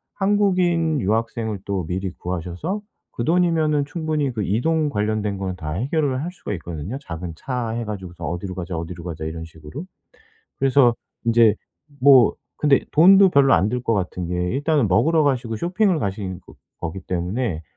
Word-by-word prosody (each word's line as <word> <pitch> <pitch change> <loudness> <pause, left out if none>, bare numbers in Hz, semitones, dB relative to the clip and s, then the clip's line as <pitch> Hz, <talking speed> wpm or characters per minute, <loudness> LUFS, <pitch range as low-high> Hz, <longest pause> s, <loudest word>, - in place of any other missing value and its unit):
한국인 180 -6 +2
유학생을 110 0 -1
또 95 -4 -2
미리 95 +2 -3
구하셔서 90 - -4 0.3
그 120 - -4
돈이면은 160 -3 +2
충분히 150 -2 -2
그 110 -3 -2
이동 150 - +1
관련된 105 -3 -1
거는 95 -1 -3
다 75 -4 -5
해결을 135 - 0
할 175 - -4
수가 155 - -6
있거든요, 85 - -6
작은 85 - -6
차 125 -1 -3
해 115 +1 -3
가지고서 95 -5 -6
"어디로 90 +2 -4
가자. 85 -1 -4
어디로 85 +1 -6
가자." 80 -3 -5
이런 80 +1 -5
식으로. 80 - -9 0.8
그래서 135 -3 +4 0.3
인제 115 -2 +5 0.5
뭐 130 -5 +7 0.2
근데 145 -2 +4
돈도 190 +5 +7
별로 140 -4 +5
안 90 +4 +3
들 125 0 -2
것 115 - 0
같은 90 -3 -3
게 90 - -2 0.2
일단은 145 -4 +1
먹으러 150 - +3
가시고 125 -5 0
쇼핑을 180 - +1
가시는 95 -3 -3
그 - - -14 0.3
거기 85 +3 -4
때문에 90 +1 -2
115 Hz, 350 characters per minute, -22 LUFS, 90-150 Hz, 0.8 s, 뭐